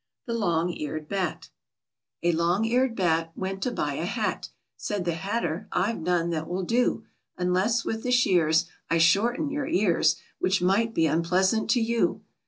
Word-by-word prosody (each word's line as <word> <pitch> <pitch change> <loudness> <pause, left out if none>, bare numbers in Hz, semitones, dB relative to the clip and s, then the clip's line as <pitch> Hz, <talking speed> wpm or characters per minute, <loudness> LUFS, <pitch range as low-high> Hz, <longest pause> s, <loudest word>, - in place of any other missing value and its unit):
THE 235 - -3
LONG 175 -6 0
EARED 150 0 -5
BAT. 190 -3 -3 0.7
A 175 - +3
long 170 +6 +1
eared 245 +1 +1
bat 165 -4 +1
Went 190 0 -4
to 250 - 0
buy 150 -11 -2
a 160 - -3
hat. 210 0 -2 0.3
Said 190 - -3
the 170 - 0
hatter, 175 -1 -3
"I've 200 +6 0
none 170 0 0
that 160 -1 -3
will 185 +2 -2
do, 240 +7 0 0.3
Unless 185 +6 +1
with 225 0 -2
the 250 - -3
shears 175 -10 +3 0.2
I 165 - +2
shorten 230 - +2
your 290 -1 -2
ears, 175 -5 +2 0.2
Which 190 +1 +2
might 200 +6 +1
be 165 - +3
unpleasant 180 +7 +1
to 240 - +4
you." 230 +1 0
185 Hz, 170 wpm, -26 LUFS, 165-225 Hz, 0.7 s, to